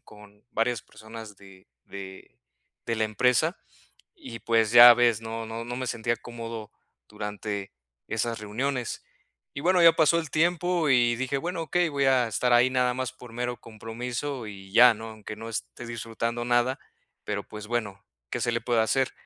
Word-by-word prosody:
con 105 0 -17
varias 115 0 0
personas 110 -2 -11
de 95 -1 -17 0.2
de 95 -10 -11 0.5
de 115 - -1
la 110 - +1
empresa 125 - +1 0.6
y, 310 -9 -10
pues, 115 -2 +2
ya 120 0 +11
ves, 120 -2 +3
no 115 0 -5
no 115 +1 -6
no 120 +1 -5
me 130 0 -3
sentía 120 0 -1
cómodo 115 -2 -8 0.4
durante 105 -1 -5 0.4
esas 115 +1 -2
reuniones. 125 +4 -3 0.5
Y 140 - -5
bueno, 180 +2 +3
ya 165 -1 +9
pasó 165 +1 +4
el 160 -4 -8
tiempo 175 +1 +1
y 120 -2 +4
dije: 130 +2 -2
"Bueno, 170 +3 -3
okey. 175 +3 +1
Voy 140 -1 0
a 130 -2 +4
estar 125 +3 0
ahí 120 +2 +5
nada 125 -1 +1
más 130 0 -3
por 125 -2 -13
mero 120 +1 -3
compromiso 120 +3 -5
y 95 -2 -11
ya, 120 +2 +8
¿no?, 110 +1 -8
aunque 110 -1 -9
no 110 +1 -8
esté 115 +1 -6
disfrutando 115 0 -3
nada, 120 +2 +1 0.5
pero - - -3
pues, 105 -1 -9
bueno, 105 -4 -3 0.3
¿qué - - -3
se 120 +1 0
le 115 - -1
puede 120 0 +1
hacer?". 130 +4 +1
120 Hz, 175 wpm, -26 LUFS, 110-130 Hz, 0.6 s, ya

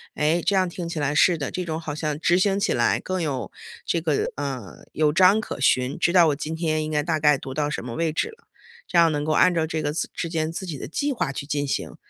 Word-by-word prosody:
哎， 155 +3 +1
这 195 - +2
样 190 -1 +3
听 175 0 -6
起 165 - -4
来 145 0 0
是 170 +3 +4
的， 145 -3 -3
这 185 - -3
种 160 -2 -3
好 155 -3 -5
像 150 -1 -3
执 175 +2 +3
行 195 +1 +2
起 210 - +1
来 120 -1 +2
更 185 -1 -3
有 145 -5 -3 0.4
这 170 - 0
个 155 -3 0
呃， 130 - -6
有 150 -1 +1
章 190 +5 +5
可 215 - -6
循， 130 0 +2
知 170 - +2
道 175 -2 +6
我 150 - +1
今 150 +2 -5
天 160 -1 -1
应 155 - -4
该 150 -1 +1
大 155 0 -1
概 150 -1 +5
读 130 0 -7
到 150 +1 -1
什 150 - -4
么 120 -2 -6
位 165 -1 0
置 155 - -1
了， 450 +1 -15 0.4
这 175 - -1
样 165 -1 +6
能 145 0 -1
够 155 - -1
按 180 +3 +4
照 160 -1 +1
这 160 0 -3
个 145 -1 -2
自 160 - -3
之 170 - -3
间 160 -1 -2
自 180 +3 -6
己 165 -5 -5
的 130 - -7
计 285 - -1
划 230 - -2
去 140 - -6
进 145 0 -1
行。 135 - -3
155 Hz, 300 characters per minute, -24 LUFS, 145-175 Hz, 0.4 s, 道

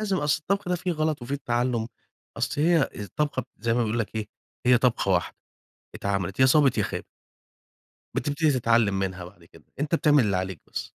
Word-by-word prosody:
لازم، 200 -3 0
أصْل 150 0 +1
الطبخ 195 +3 -1
ده 180 - +2
فيه 180 0 -2
غلَط 155 -4 -1
وفيه 140 +3 -3
تعلُّم، 120 -1 0 0.5
أصْل 130 +5 -1
هي 165 -3 +3
الطبخة 130 +6 -2
زي 115 -1 0
ما 120 - +2
بيقول 110 +2 -1
لك 110 -1 -3
إيه، 105 -1 -3 0.4
هي 125 -1 +6
طبخة 120 -6 +1
واحدة 90 -1 0 0.6
اتعملِت، 95 0 -2
يا 130 - +7
صابِت 140 -1 +4
يا - - +2
خابِت. - - -5 1.1
بتبتدي 145 +3 +1
تتعلِّم 115 -6 +2
منها 95 -2 -3
بعد 90 -1 -15
كده، 80 -2 -18 0.2
أنت 150 +3 +1
بتعمل 150 -6 +4
اللي 100 -3 +1
عليك 95 -2 -4
بس. - - -4
120 Hz, 185 wpm, -26 LUFS, 100-150 Hz, 1.1 s, يا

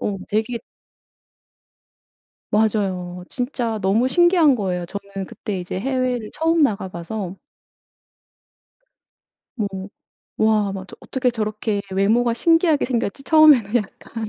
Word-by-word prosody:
어 205 - -2
되게 220 +3 -1 1.9
맞아요. 190 -5 0
진짜 245 -3 -2
너무 205 +6 +2
신기한 345 -2 +4
거예요. 180 -5 -2
저는 200 +1 -6
그때 200 -3 -5
이제 180 +1 -4
해외를 250 -2 -1
처음 325 0 +2
나가 200 -8 0
봐서. 185 +2 -6 2.2
뭐 210 -3 0 0.7
와. 215 -2 +2
맞아. 190 0 -8
'어떻게 260 -1 -1
저렇게 215 -2 -2
외모가 220 +5 +2
신기하게 325 +4 +3
생겼지?' 240 0 -2
처음에는 290 -9 +5
약간 225 +1 -3
220 Hz, 240 characters per minute, -21 LUFS, 195-255 Hz, 2.2 s, 처음에는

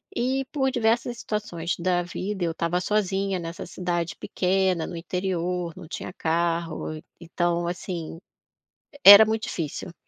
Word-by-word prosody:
E 260 +2 0
por 265 -3 +1
diversas 235 0 +1
situações 180 -7 -3
da 175 0 +1
vida, 190 +2 -4
eu 165 - 0
estava 170 +2 -1
sozinha 195 -2 0
nessa 165 +1 -6
cidade 175 -2 -3
pequena 185 -2 0
no - - -6
interior. 180 -1 -2
Não 160 - -10
tinha 175 - -6
carro, 165 -2 -2 0.2
então, 170 0 -1
assim, 175 -2 -5 0.8
era 205 +2 +12
muito 220 0 -1
difícil. 165 +2 -4
É - - -13
180 Hz, 135 wpm, -25 LUFS, 170-200 Hz, 0.8 s, era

